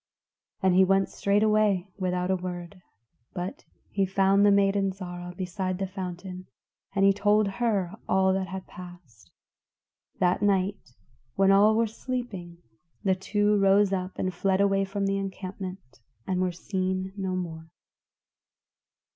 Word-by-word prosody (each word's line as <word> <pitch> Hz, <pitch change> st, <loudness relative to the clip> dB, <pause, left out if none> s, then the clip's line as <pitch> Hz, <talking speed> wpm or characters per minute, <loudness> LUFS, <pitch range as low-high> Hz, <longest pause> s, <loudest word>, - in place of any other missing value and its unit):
And 190 Hz, -1 st, +4 dB
he 190 Hz, +1 st, +6 dB
went 195 Hz, +1 st, +2 dB
straightway 205 Hz, -2 st, +2 dB
without 180 Hz, 0 st, -1 dB
a -, -, +3 dB
word, 180 Hz, 0 st, -6 dB, 0.5 s
but 180 Hz, +1 st, -5 dB, 0.3 s
he 195 Hz, -, +1 dB
found 195 Hz, +1 st, +3 dB
the 205 Hz, -, +6 dB
maiden, 200 Hz, -1 st, +3 dB
Zarah, 180 Hz, -1 st, -7 dB
beside 185 Hz, 0 st, -3 dB
the 195 Hz, -, -2 dB
fountain, 185 Hz, -1 st, -7 dB, 0.5 s
and 195 Hz, 0 st, +4 dB
he 195 Hz, -, +6 dB
told 210 Hz, +1 st, +3 dB
her 200 Hz, -4 st, 0 dB, 0.2 s
all 190 Hz, 0 st, +3 dB
that 190 Hz, -1 st, -1 dB
had 190 Hz, +1 st, -6 dB
passed. 175 Hz, -, -13 dB, 0.9 s
That 180 Hz, +1 st, +2 dB
night 195 Hz, -9 st, 0 dB, 0.4 s
when 195 Hz, 0 st, +4 dB
all 205 Hz, +2 st, +5 dB
were 230 Hz, +1 st, +3 dB
sleeping, 215 Hz, -7 st, -6 dB, 0.4 s
the 190 Hz, -2 st, +3 dB
two 205 Hz, +2 st, +1 dB
rose 195 Hz, 0 st, +4 dB
up 185 Hz, 0 st, -3 dB
and 185 Hz, 0 st, -1 dB
fled 190 Hz, +2 st, +1 dB
away 195 Hz, -1 st, +3 dB
from 195 Hz, +1 st, -2 dB
the 195 Hz, 0 st, 0 dB
encampment 190 Hz, -, -7 dB, 0.3 s
and 185 Hz, -1 st, -1 dB
were 185 Hz, -1 st, +1 dB
seen 185 Hz, +1 st, -3 dB
no 190 Hz, -2 st, -2 dB
more. 165 Hz, -3 st, -5 dB
190 Hz, 140 wpm, -27 LUFS, 180-200 Hz, 0.9 s, he